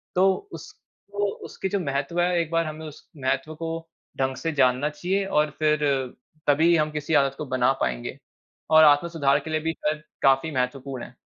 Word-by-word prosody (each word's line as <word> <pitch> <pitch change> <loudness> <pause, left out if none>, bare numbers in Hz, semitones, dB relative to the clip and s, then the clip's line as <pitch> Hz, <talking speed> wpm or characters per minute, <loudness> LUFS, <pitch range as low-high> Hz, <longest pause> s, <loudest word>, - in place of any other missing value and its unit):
तो 190 +2 +5 0.2
उसको 205 0 -6 0.2
उसकी 190 - -5
जो 200 +1 0
महत्त्व 140 +2 -2
है, 175 0 +2
एक 165 0 -5
बार 165 0 +1
हमें 155 +1 -6
उस 150 - -13
महत्त्व 135 +4 -2
को 165 0 -5 0.3
ढंग 130 0 0
से 165 +3 -3
जानना 130 +1 +2
चाहिए 185 +6 -1
और 150 -5 +2
फिर 155 -1 +2 0.7
तभी 160 +4 +5
हम 155 -1 +1
किसी 150 +1 -3
आदत 140 -2 +3
को 150 - -4
बना 130 0 +2
पाएँगे, - - -2 0.5
और 155 0 +7
आत्म-सुधार 145 -1 +4
के 160 - -9
लिए 155 0 0
भी 160 +1 -2
कर 150 -1 -2 0.2
काफ़ी 135 +4 +3
महत्वपूर्ण 130 0 -3
है। - - -15
150 Hz, 180 wpm, -25 LUFS, 135-165 Hz, 0.7 s, और